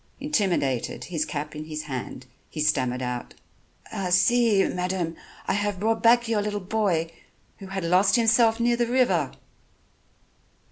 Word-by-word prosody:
Intimidated, 190 Hz, -, -1 dB
his 160 Hz, -4 st, -2 dB
cap 150 Hz, +1 st, -5 dB
in 155 Hz, 0 st, -6 dB
his 155 Hz, -1 st, -5 dB
hand, 130 Hz, -2 st, -6 dB, 0.2 s
he -, -, -8 dB
stammered 130 Hz, -4 st, 0 dB
out: 125 Hz, -1 st, -5 dB, 0.7 s
"See, 210 Hz, +2 st, +4 dB
madam, 180 Hz, -2 st, -2 dB, 0.3 s
I -, -, +1 dB
have 205 Hz, -2 st, -1 dB
brought 225 Hz, +2 st, 0 dB
back 235 Hz, 0 st, +4 dB
your 220 Hz, -2 st, +1 dB
little 205 Hz, 0 st, -2 dB
boy 185 Hz, -5 st, -1 dB, 0.5 s
who 195 Hz, -, -9 dB
had 190 Hz, -1 st, -4 dB
lost 185 Hz, +4 st, +3 dB
himself 230 Hz, -1 st, +3 dB
near 240 Hz, 0 st, +2 dB
the 240 Hz, 0 st, 0 dB
river." 210 Hz, -, +2 dB
190 Hz, 140 wpm, -25 LUFS, 155-225 Hz, 0.7 s, See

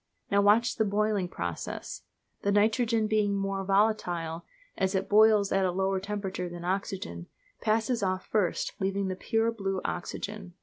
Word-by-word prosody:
Now 200 Hz, 0 st, +4 dB
watch 215 Hz, +4 st, +4 dB
the 220 Hz, -, +3 dB
boiling 210 Hz, -2 st, +1 dB
process. 85 Hz, -, -5 dB, 0.4 s
The 200 Hz, -, +1 dB
nitrogen 220 Hz, +2 st, +2 dB
being 210 Hz, -2 st, +1 dB
more 195 Hz, 0 st, -2 dB
volatile 180 Hz, -5 st, 0 dB, 0.3 s
as 190 Hz, +1 st, 0 dB
it 190 Hz, -, 0 dB
boils 210 Hz, -1 st, +5 dB
at 195 Hz, 0 st, +2 dB
a 185 Hz, -, +2 dB
lower 190 Hz, +1 st, 0 dB
temperature 195 Hz, -2 st, -4 dB
than 175 Hz, 0 st, -8 dB
oxygen 185 Hz, -, -3 dB, 0.3 s
passes 225 Hz, +2 st, +1 dB
off 185 Hz, -1 st, -1 dB
first, 205 Hz, -6 st, 0 dB
leaving 195 Hz, 0 st, -1 dB
the 185 Hz, -, -2 dB
pure, 225 Hz, +4 st, 0 dB
blue 195 Hz, -4 st, -2 dB
oxygen. 190 Hz, +1 st, -5 dB
200 Hz, 150 wpm, -29 LUFS, 185-215 Hz, 0.4 s, boils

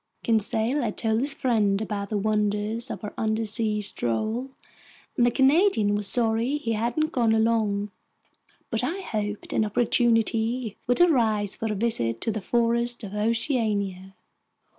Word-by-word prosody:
Conseil 225 Hz, +4 st, +1 dB
had 225 Hz, -4 st, -3 dB
told 220 Hz, -1 st, +1 dB
his 275 Hz, +2 st, +3 dB
friend 215 Hz, -6 st, +1 dB
about 205 Hz, -2 st, -4 dB
the 215 Hz, -, -1 dB
wonders 210 Hz, +3 st, -1 dB
of -, -, -6 dB
our 210 Hz, -, -6 dB
undersea 220 Hz, 0 st, +1 dB
stroll, 215 Hz, -, -2 dB, 0.7 s
and 240 Hz, -3 st, +3 dB
the -, -, +5 dB
Canadian 265 Hz, -, +3 dB
was 205 Hz, -1 st, 0 dB
sorry 230 Hz, +5 st, +1 dB
he 230 Hz, -6 st, -3 dB
hadn't 240 Hz, +8 st, -1 dB
gone 230 Hz, -3 st, +2 dB
along. 215 Hz, -2 st, 0 dB, 0.8 s
But 225 Hz, +1 st, -1 dB
I 340 Hz, +10 st, -2 dB
hoped 210 Hz, -, -4 dB
an -, -, +2 dB
opportunity 225 Hz, +1 st, +1 dB
would 245 Hz, +6 st, +2 dB
arise 220 Hz, -, +2 dB
for 225 Hz, -1 st, -3 dB
a -, -, -2 dB
visit 120 Hz, -, 0 dB
to 225 Hz, -, -1 dB
the 215 Hz, 0 st, -4 dB
forests 235 Hz, +2 st, +1 dB
of 200 Hz, -1 st, -7 dB
Oceania. 210 Hz, -4 st, -1 dB
220 Hz, 145 wpm, -25 LUFS, 210-240 Hz, 0.8 s, the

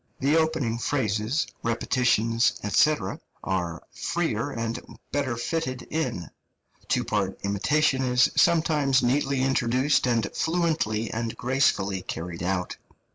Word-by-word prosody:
The 140 Hz, +3 st, +2 dB
opening 160 Hz, -8 st, +1 dB
phrases, 120 Hz, +2 st, 0 dB, 0.2 s
repetitions, 115 Hz, 0 st, +2 dB, 0.2 s
&c., 155 Hz, 0 st, +5 dB, 0.5 s
are 90 Hz, -3 st, -2 dB
freer 145 Hz, -7 st, -1 dB
and 115 Hz, -3 st, -3 dB, 0.3 s
better 135 Hz, -5 st, -1 dB
fitted 130 Hz, 0 st, -2 dB
in; 150 Hz, -, -2 dB, 0.6 s
two -, -, +1 dB
part 95 Hz, -2 st, -1 dB
imitation 130 Hz, +8 st, +1 dB
is 125 Hz, -1 st, +3 dB
sometimes 150 Hz, -5 st, +3 dB
neatly 135 Hz, +1 st, +1 dB
introduced 130 Hz, +1 st, +2 dB
and 115 Hz, -4 st, +1 dB
fluently 160 Hz, -10 st, 0 dB
and 115 Hz, 0 st, -3 dB
gracefully 105 Hz, -7 st, +1 dB
carried 85 Hz, 0 st, -6 dB
out. 90 Hz, 0 st, -2 dB
125 Hz, 110 wpm, -26 LUFS, 110-145 Hz, 0.6 s, c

